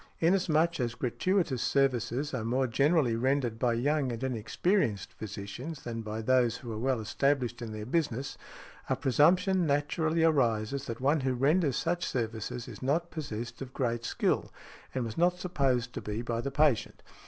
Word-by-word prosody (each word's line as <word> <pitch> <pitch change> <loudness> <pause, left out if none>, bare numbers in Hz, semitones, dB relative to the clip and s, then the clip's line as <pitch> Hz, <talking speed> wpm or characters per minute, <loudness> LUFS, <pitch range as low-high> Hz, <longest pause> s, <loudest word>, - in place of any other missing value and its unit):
Inasmuch 170 -2 +2
as 120 -2 -1
gratuitous 135 - 0
services 135 0 +1
are 125 -4 -2
more 125 +4 +1
generally 135 0 +2
rendered 125 -2 0
by 120 -2 +2
young 135 +2 +1
and 115 +2 -5
inexperienced 125 - 0
physicians 110 +9 -7
than 115 -1 -4
by 110 0 -5
those 125 -1 +3
who 120 -2 -8
are 110 - -4
well 130 0 +1
established 120 +2 0
in 115 -2 -5
their 105 0 -6
business, 135 -2 -1 0.5
a - - +2
presumption 180 +6 +3
naturally 155 +3 +1
arises 135 -4 +2
that 115 0 -5
one 145 +4 +3
who 130 -1 0
renders 145 +2 +2
such 175 +1 -1
services 115 0 -3
is - - -9
not 160 +6 0
possessed 120 -6 -5
of 130 -1 -7
great 120 -2 -1
skill, - - 0 0.4
and 130 -2 0
was 115 +6 -5
not 175 +1 +3
supposed 135 -9 0
to - - -5
be 105 +3 -4
by 115 -1 -2
the 140 - -2
patient. 140 -4 +1
130 Hz, 165 wpm, -30 LUFS, 115-150 Hz, 0.5 s, those